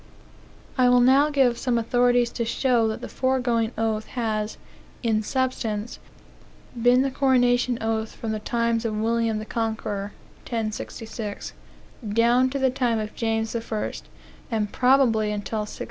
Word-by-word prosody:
I 250 -1 +5
will 250 0 +5
now 270 +4 +5
give 265 -5 +2
some 250 -3 0
authorities 245 +1 +2
to 235 - -2
show 235 0 +2
that 220 - -3
the - - -5
foregoing 250 -4 0
oath 220 -1 -1
has, 215 -2 -1 0.5
in 220 -2 +2
substance, 230 -3 -2 0.8
been 245 +2 +4
the 270 - -1
coronation 245 -2 +2
oath 225 0 -2
from 225 - -4
the 215 - -2
times 235 +1 0
of 220 -2 -2
William 230 0 0
the 215 - -5
Conqueror, 220 -3 -3 0.3
(1066,) 220 -1 -5 0.6
down 240 +3 +4
to 275 - -3
the 265 -1 +2
time 245 -3 0
of 215 -1 -4
James 225 -1 -1
the 235 - -2
First, 220 -2 -4 0.4
and 215 -3 -1
probably 250 -5 +3
until 210 +1 -3
1688. 210 0 -6
230 Hz, 145 wpm, -24 LUFS, 220-250 Hz, 0.8 s, I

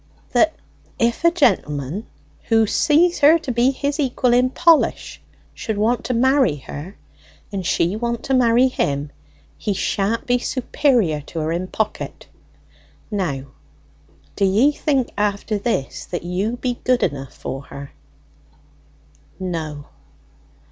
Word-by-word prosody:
"That 315 +6 +3 0.4
if 235 +5 0
any 335 - +6
gentleman, 180 - 0 0.4
who 225 -1 +3
sees 325 - +3
her 300 +3 +7
to 315 -6 -5
be 240 +2 +3
his 285 +2 -2
equal 255 -3 +1
in 250 +1 +4
polish, 335 +3 +2 0.3
should 220 -2 -4
want 230 +4 +1
to 250 - -1
marry 260 - +3
her, 150 +7 -9 0.6
and 195 -2 -3
she 175 +2 +1
want 235 +1 -2
to 270 - -1
marry 245 0 +4
him, 145 - -2 0.5
he 205 - -1
sha'n't 200 +3 -1
be 245 0 +2
superior 245 - +1
to 165 - -5
her 155 +1 -1
in 175 +2 -2
pocket. 215 +2 -4 0.9
Now 165 -10 -2 0.9
do 200 - -1
ye 210 +9 +4
think 275 -4 0
after 205 +1 0
this 200 - -2
that 175 - -5
you 190 +7 -2
be 245 -1 -3
good 255 -1 +2
enough 140 -5 -3
for 135 +2 -6
her?" 140 0 -9 1.5
"No." 160 -6 -4
225 Hz, 135 wpm, -21 LUFS, 175-255 Hz, 1.5 s, her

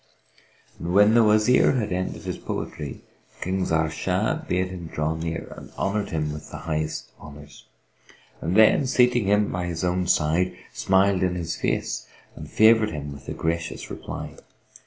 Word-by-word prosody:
When 100 +5 +4
the 120 0 +6
Wazir 110 +5 +4
had 110 -6 -1
ended 90 +1 -3
his - - -4
poetry, 75 -3 -5 0.4
King 95 +1 -1
Zahr 80 -1 +1
Shah - - 0
bade 90 +1 0
him 90 -3 -7
draw 75 0 -1
near 80 0 -5
and - - -11
honoured 100 +1 -1
him 75 -2 -2
with 75 0 -9
the - - -7
highmost 80 -1 -3
honours; 75 -1 -13 0.7
then, 110 - +4
seating 125 -4 +3
him 105 +1 +2
by 90 0 -2
his 85 0 -4
own 90 0 0
side, 85 +2 +1 0.2
smiled 95 0 +2
in 90 -1 +1
his 85 -2 -3
face - - -2 0.3
and - - -9
favoured 110 0 +5
him 75 -2 -6
with 70 -2 -11
a - - -3
gracious 85 0 -3
reply. - - -7
90 Hz, 155 wpm, -24 LUFS, 80-105 Hz, 0.7 s, the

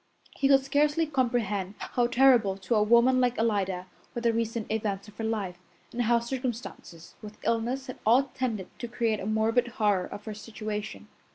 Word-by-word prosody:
He 275 - +2
could 270 -1 +6
scarcely 295 +3 +2
comprehend 235 -9 -1
how 245 -1 0
terrible 240 -6 +4
to 190 +3 -2
a 215 - +4
woman 235 +4 +5
like 245 -1 +1
Alida 195 -5 0 0.3
were 240 - -2
the 235 -1 +2
recent 230 -1 -2
events 205 -3 -2
of 210 - -14
her - - -2
life, 205 -5 -2 0.3
and 245 - -2
how 235 0 +3
circumstances, 235 -8 -5
with 210 0 -10
illness, 240 +4 0
had 255 - -8
all 240 +5 +5
tended 225 -8 -2
to 240 - -4
create 230 -2 -1
a 195 - -5
morbid 225 +3 +2
horror 205 -4 +2
of 205 0 -9
her 215 - -5
situation. 215 0 -6
230 Hz, 180 wpm, -28 LUFS, 210-245 Hz, 0.3 s, could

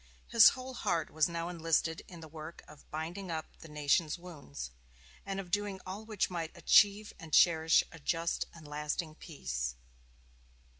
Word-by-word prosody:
His 230 -2 +9
whole 260 0 -7
heart 170 -9 -1
was 155 +1 +2
now 170 0 -3
enlisted 165 -1 0
in 175 -3 -11
the 160 - -9
work 155 +1 -9
of 150 -1 -16
"binding 170 +5 -5
up 160 -1 -2
the 165 - -11
nation's 150 +1 +1
wounds," 145 - -8 0.6
and 195 0 -2
of 180 -3 -7
doing 205 -1 -1
all 195 +4 -6
which 215 -3 0
might 170 -3 -4
"achieve 210 0 +5
and 165 -3 -10
cherish 160 0 +5
a 165 - -11
just 165 +3 -1
and 155 -3 -13
lasting 150 +2 -3
peace." 65 - -4
165 Hz, 160 wpm, -32 LUFS, 155-185 Hz, 0.6 s, His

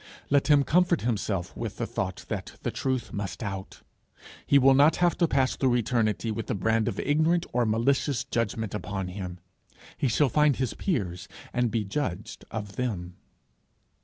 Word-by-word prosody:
Let 140 -1 +3
him 145 -2 +5
comfort 175 +2 +3
himself 100 -6 -2
with - - -5
the - - -1
thought - - -4
that - - -4
the - - -1
truth 130 -3 -2
must 100 -1 -4
out. 95 -2 -6 0.6
He 140 - +6
will 135 0 +6
not 145 +4 +5
have 175 -1 +2
to 170 - +4
pass 135 -3 +1
through 130 -3 +2
eternity 115 -2 0
with 110 +1 -4
the - - -1
brand 110 +3 +1
of 105 -4 -2
ignorant 160 +4 +2
or 120 -1 +2
malicious 130 +4 +1
judgment 115 -4 -2
upon 100 -3 -3
him. 90 -1 -6 0.6
He 140 - +2
shall 135 +5 +3
find 150 +1 +3
his 130 -2 -1
peers 95 - -2 0.3
and 125 -1 +1
be 110 0 0
judged 100 -3 -4
of 105 -2 -6
them. 95 -8 -3
120 Hz, 170 wpm, -27 LUFS, 105-140 Hz, 0.6 s, He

